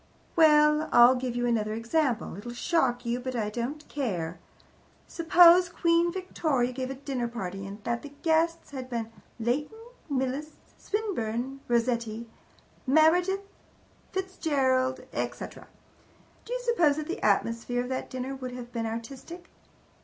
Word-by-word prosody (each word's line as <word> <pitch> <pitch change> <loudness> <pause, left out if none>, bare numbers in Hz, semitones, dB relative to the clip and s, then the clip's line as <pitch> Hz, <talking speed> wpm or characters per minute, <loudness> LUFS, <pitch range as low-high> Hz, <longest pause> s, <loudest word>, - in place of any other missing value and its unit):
Well, 300 -1 +5
I'll 240 +1 +8
give 250 -1 -3
you 245 0 0
another 215 -3 0
example. 235 - 0
It'll 235 +5 -7
shock 245 -5 +1
you, 235 +1 -1
but 255 0 -5
I 210 -3 -1
don't 255 +7 -4
care. 180 - -3 0.7
Suppose 350 +1 +6
Queen 340 0 +2
Victoria 310 -9 -1
gave 255 0 -4
a 270 - -4
dinner 265 -3 -3
party, 195 -4 -5
and 205 +2 -9
that 235 +1 -1
the 290 - -10
guests 330 0 +1
had 260 -2 -6
been 230 -2 -3 0.3
Leighton, 270 - -1 0.3
Millais, 275 +3 -2 0.3
Swinburne, 270 - -2
Rossetti, 235 -1 0 0.6
Meredith, 355 +7 +3 0.6
Fitzgerald, 275 -9 0
etc. - - -5 0.8
Do 480 - -5
you - - -2
suppose 350 -12 +3
that 310 - -3
the 345 - -4
atmosphere 230 +4 +1
of 250 - -7
that 260 - -3
dinner 260 +1 -4
would 255 -2 -6
have 245 -1 -8
been 230 -1 -2
artistic? 260 +10 -7
260 Hz, 140 wpm, -28 LUFS, 235-315 Hz, 0.8 s, I'll